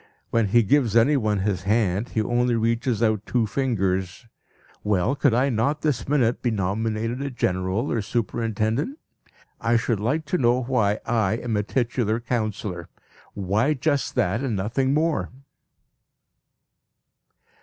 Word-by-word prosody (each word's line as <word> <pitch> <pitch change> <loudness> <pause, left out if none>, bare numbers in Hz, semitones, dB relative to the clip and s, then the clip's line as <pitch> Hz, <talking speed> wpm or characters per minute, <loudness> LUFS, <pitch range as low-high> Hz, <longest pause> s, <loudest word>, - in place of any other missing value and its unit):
When 115 -2 +2
he 115 +4 +4
gives 115 0 +2
anyone 115 -5 +3
his 95 -2 -1
hand, 105 +1 0
he 110 - 0
only 120 +1 +1
reaches 115 0 0
out 110 -2 +1
two 120 -3 +1
fingers. 95 -5 -1 0.6
Well, 105 +5 +1
could 140 -3 +2 0.2
not 120 +7 +1
I - - -36
this 145 -6 -1
minute 125 -5 +2
be 120 - +1
nominated 110 +4 -2
a 140 - -2
general 95 0 -1
or 115 - 0
a - - -1
superintendent? 115 - -1 0.6
I 115 0 +2
should 115 -2 0
like 145 +9 -1
to 180 +5 -1
know 125 +1 +2
why 110 -5 +1
I 110 -4 +1
am 115 0 -2
a 105 - +2
titular 115 0 -1
councillor 110 -7 -3 0.5
why 105 +10 +1
just 145 +1 -1
that, 120 -1 +1
and 130 -6 -1
nothing 115 +7 0
more? 160 +1 0
115 Hz, 145 wpm, -24 LUFS, 105-125 Hz, 0.6 s, he